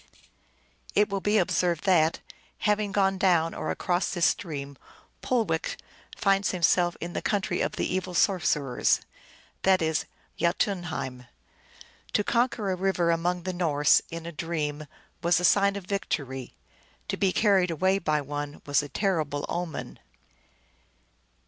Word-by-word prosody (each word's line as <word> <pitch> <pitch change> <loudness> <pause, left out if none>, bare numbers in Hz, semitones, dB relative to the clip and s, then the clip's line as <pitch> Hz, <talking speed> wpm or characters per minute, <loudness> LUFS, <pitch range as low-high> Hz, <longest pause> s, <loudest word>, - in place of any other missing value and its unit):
It 210 +1 +4
will 195 -1 -2
be 210 +2 +2
observed 175 -3 +1
that, 165 -4 +3 0.4
having 210 -1 0
gone 195 -1 +1
down 170 -4 +3
or - - -4
across 175 +1 0
this 175 -2 +1
stream, 140 -8 -2 0.5
Pulewech 220 -10 0 0.4
finds 195 0 +2
himself 175 0 +2
in 175 +1 -5
the - - -2
country 205 -2 -1
of - - -1
the - - -2
Evil 185 -1 -2
sorcerers; 150 - +2 0.6
that 190 -1 +4
is, 160 -1 0 0.3
Jdtunheim. 170 -8 -1 0.9
To 205 - +2
conquer 235 -3 0
a - - 0
river 180 -2 +1
among 175 +1 0
the 185 +1 -3
Norse, 150 -5 +3
in 165 0 -7
a 170 - -5
dream, 155 -2 -3 0.3
was 175 +1 +3
a - - -4
sign 200 +2 +4
of 200 -3 -6
victory; 135 -10 -3 0.5
to - - -2
be 195 -2 +1
carried 195 -3 +3
away 185 +4 +1
by 155 -4 0
one 145 +1 -6
was 145 0 +2
a 145 - -8
terrible 155 -8 -1
omen. 175 -3 -5
175 Hz, 140 wpm, -27 LUFS, 155-195 Hz, 0.9 s, It